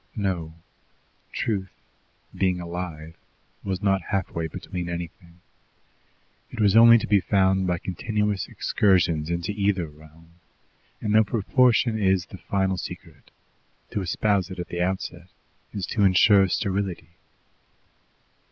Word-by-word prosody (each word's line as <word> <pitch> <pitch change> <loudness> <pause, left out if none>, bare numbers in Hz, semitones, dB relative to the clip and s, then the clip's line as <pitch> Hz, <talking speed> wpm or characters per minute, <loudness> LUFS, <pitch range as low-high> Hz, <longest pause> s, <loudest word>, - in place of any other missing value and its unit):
No; 90 -7 -3 0.8
truth, 95 -4 -2 0.6
being 90 -2 0
alive, 85 -2 -6 0.5
was 95 0 -3
not 95 -1 +2
halfway 90 -4 -2
between 85 +2 -6
anything. 85 0 -8 1.1
It 120 - -9
was 105 -2 +3
only 115 +1 +9
to - - -2
be 105 -2 +3
found 95 -1 +2
by 90 -1 0
continuous 105 +3 -2
excursions 85 -6 +1
into 85 +3 -2
either 100 -3 0
realm, 80 +2 -17 0.7
and 105 - -1
though 110 0 +6
proportion 115 +1 +2
is 95 -3 +2
the 95 - -12
final 95 -1 -1
secret, 75 - -9 0.6
to 100 - -2
espouse 95 +1 0
it 95 - -8
at 90 - -6
the 85 - -3
outset 90 -1 -3 0.4
is 100 -3 -4
to 105 +3 -1
insure 95 +1 +5
sterility. 95 -3 -2
95 Hz, 125 wpm, -25 LUFS, 85-100 Hz, 1.1 s, only